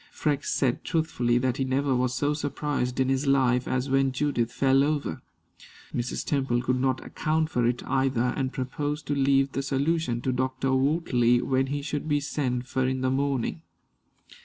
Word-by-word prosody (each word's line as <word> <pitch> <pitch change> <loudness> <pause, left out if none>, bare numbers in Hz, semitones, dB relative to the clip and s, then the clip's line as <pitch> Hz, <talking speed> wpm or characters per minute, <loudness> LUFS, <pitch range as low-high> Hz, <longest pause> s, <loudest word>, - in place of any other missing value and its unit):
Freke 145 -2 -1
said 125 -3 0
truthfully 155 -8 0
that 125 0 0
he 135 - 0
never 135 +1 +1
was 125 0 0
so 145 +3 +1
surprised 145 -3 -2
in 130 - +2
his 135 +2 0
life 130 -2 +3
as 130 +1 -1
when 135 0 +2
Judith 130 -4 0
fell 135 +1 +3
over. 145 - -1 0.7
Mrs. 120 0 -3
Temple 135 -4 0
could 130 0 0
not 130 -1 0
account 155 +1 -1
for 120 -1 +1
it 120 0 -1
either, 130 -2 +1
and 130 -2 -1
proposed 145 +3 -3
to 145 - -1
leave 135 0 +2
the 135 - -2
solution 140 -2 0
to 130 - 0
Dr. 130 +1 -1
Wortley 130 -4 +2
when 135 0 +1
he 145 +1 -3
should 150 +1 -3
be 145 0 +2
sent 130 -4 -2
for 130 0 -1
in 130 0 -1
the 130 0 +1
morning. 140 +2 -1
135 Hz, 180 wpm, -26 LUFS, 125-145 Hz, 0.7 s, life